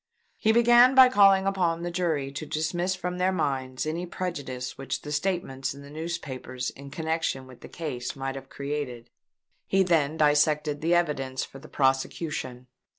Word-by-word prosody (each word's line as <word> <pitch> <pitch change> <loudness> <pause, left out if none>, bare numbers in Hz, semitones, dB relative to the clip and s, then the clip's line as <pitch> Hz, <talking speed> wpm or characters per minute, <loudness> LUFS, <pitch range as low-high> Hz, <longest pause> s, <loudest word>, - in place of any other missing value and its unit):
He 220 - +3
began 240 +3 +6
by 260 -1 +9
calling 195 -4 +5
upon 175 -4 0
the 175 - -3
jury 160 -6 -1
to 150 +3 -6
dismiss 175 +5 -1
from 180 0 -4
their 185 +1 +2
minds 130 -7 -2
any 170 +3 -3
prejudice 140 -9 -4
which 135 - -4
the 150 - -6
statements 150 -5 -2
in 140 - -11
the 140 - -12
newspapers 145 -6 -5
in 140 0 -11
connexion 160 -3 -2
with 130 -1 -15
the - - -11
case 135 -7 -5
might 135 0 -3
have 135 0 -9
created. 140 -4 -5 0.6
He 195 0 +3
then 160 -4 +1
dissected 150 0 +2
the 170 +2 +3
evidence 135 -6 0
for 135 - -13
the 155 - -14
prosecution. 135 -1 -1
150 Hz, 165 wpm, -27 LUFS, 135-175 Hz, 0.6 s, by